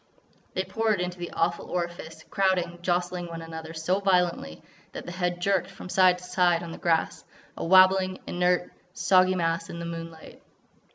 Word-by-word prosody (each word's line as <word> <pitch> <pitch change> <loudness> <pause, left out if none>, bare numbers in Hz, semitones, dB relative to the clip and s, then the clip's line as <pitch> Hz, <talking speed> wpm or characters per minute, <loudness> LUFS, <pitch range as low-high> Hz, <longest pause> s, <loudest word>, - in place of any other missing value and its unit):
They 185 - 0
poured 215 +2 0
into 180 0 -3
the 175 - -5
awful 170 +1 -1
orifice, 170 -2 -5
crowding, 180 -3 +1
jostling 175 0 -1
one 165 -1 -7
another 160 0 -8
so 175 +5 0
violently 180 - 0 0.3
that - - -7
the 175 - -6
head 175 -1 -2
jerked 190 0 +1
from 195 -1 -10
side 185 -1 +4
to 180 - -14
side 175 -1 +2
on 170 - -7
the - - -9
grass, 165 -2 0 0.3
a - - -5
wabbling, 185 +1 +5
inert, 180 0 0 0.2
soggy 185 0 +4
mass 165 -1 -1
in - - -7
the 170 - -5
moonlight. 165 -1 -8
180 Hz, 170 wpm, -26 LUFS, 170-185 Hz, 0.3 s, wabbling